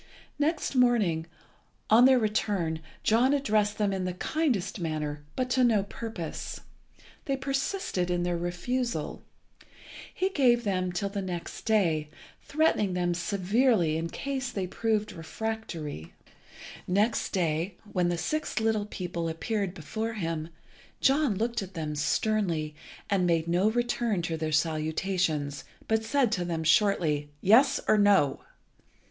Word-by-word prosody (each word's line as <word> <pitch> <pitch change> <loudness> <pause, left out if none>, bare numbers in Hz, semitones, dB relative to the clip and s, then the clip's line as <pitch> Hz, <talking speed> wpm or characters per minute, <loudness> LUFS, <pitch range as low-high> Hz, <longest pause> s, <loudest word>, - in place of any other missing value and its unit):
Next 305 +1 0
morning, 215 -11 +3 0.6
on 235 +3 +8
their 260 0 +6
return, 205 -7 0 0.2
John 245 +6 +4
addressed 215 -6 +1
them 205 -2 +1
in 190 -1 -2
the 180 - -2
kindest 245 - -1
manner, 150 -3 -3
but 255 - 0
to 255 +1 +3
no 220 -5 +4
purpose. 200 -4 -6 0.6
They 275 -2 0
persisted 270 - -1
in 175 0 0
their 175 0 0
refusal. 230 +9 -2 0.9
He 375 - 0
gave 245 -8 +3
them 185 -3 0
till 185 +3 -2
the 200 0 -3
next 180 -3 -6
day, 165 -9 +2 0.3
threatening 280 - +1
them 175 -1 +1
severely 190 0 +2
in 165 +1 -2
case 270 +1 -3
they 195 -5 -2
still 180 - -11
proved 215 -2 +1
refractory. 165 - -5 0.7
Next 210 +5 +1
day, 170 0 -1 0.2
when 180 -2 +2
the 175 - -1
six 305 - -2
little 220 -2 0
people 175 -4 -4
appeared 195 +3 -2
before 220 +8 -4
him, 165 -5 -3 0.5
John 275 -4 +3
looked 230 +3 -1
at 190 -1 -8
them 155 -2 -3
sternly, 170 -3 0 0.3
and 190 -3 +2
made 165 -1 +1
no 180 +5 +3
return 240 -4 0
to 165 -1 -2
their 155 -1 -2
salutations, 155 -1 0 0.2
but 220 0 +1
said 250 0 +2
to 180 -5 0
them 165 -2 -2
shortly 155 -4 +2
"Yes, 260 - +5
or 215 - +4
No?" 200 -9 +4
195 Hz, 140 wpm, -28 LUFS, 170-230 Hz, 0.9 s, on